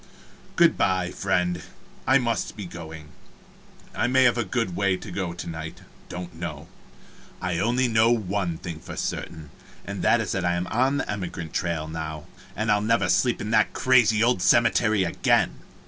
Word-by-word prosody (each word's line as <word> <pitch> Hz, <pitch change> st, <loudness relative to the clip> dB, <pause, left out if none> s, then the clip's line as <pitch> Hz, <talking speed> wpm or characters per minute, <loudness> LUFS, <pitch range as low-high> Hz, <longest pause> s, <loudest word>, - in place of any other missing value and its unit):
Good -, -, +4 dB
by, 90 Hz, -1 st, +1 dB
friend, 90 Hz, -2 st, 0 dB, 0.5 s
I 130 Hz, +1 st, +6 dB
must 115 Hz, -4 st, -2 dB
be 100 Hz, -, -5 dB
going. 80 Hz, -3 st, -9 dB, 0.8 s
I -, -, 0 dB
may 130 Hz, +1 st, +4 dB
have 125 Hz, -2 st, +4 dB
a 120 Hz, -, 0 dB
good 100 Hz, -2 st, -2 dB
way 100 Hz, -2 st, +1 dB
to 95 Hz, -, -9 dB
go 90 Hz, -2 st, -3 dB
to 85 Hz, -, -7 dB
night 80 Hz, -1 st, -7 dB, 0.3 s
don't 90 Hz, -1 st, -7 dB
know. 80 Hz, -3 st, -6 dB, 0.7 s
I 90 Hz, -2 st, -2 dB
only 125 Hz, +5 st, +2 dB
know 115 Hz, 0 st, +4 dB
one 100 Hz, -6 st, 0 dB
thing 85 Hz, -2 st, -7 dB
for -, -, -9 dB
certain, 80 Hz, -3 st, -5 dB, 0.3 s
and -, -, -5 dB
that -, -, +4 dB
is -, -, -2 dB
that 95 Hz, -, -1 dB
I 85 Hz, 0 st, +1 dB
am 85 Hz, +1 st, -2 dB
on 130 Hz, +5 st, +2 dB
the -, -, -2 dB
emigrant 90 Hz, -5 st, -5 dB
trail 85 Hz, -3 st, -1 dB
now, 80 Hz, -1 st, -6 dB, 0.3 s
and 110 Hz, +1 st, 0 dB
I'll 105 Hz, 0 st, +3 dB
never 105 Hz, -3 st, +1 dB
sleep 120 Hz, +7 st, +2 dB
in 105 Hz, -, -4 dB
that -, -, +3 dB
crazy 120 Hz, -4 st, +4 dB
old 120 Hz, -5 st, +2 dB
cemetery 110 Hz, -3 st, +3 dB
again. 85 Hz, -, +1 dB
95 Hz, 180 wpm, -25 LUFS, 85-115 Hz, 0.8 s, I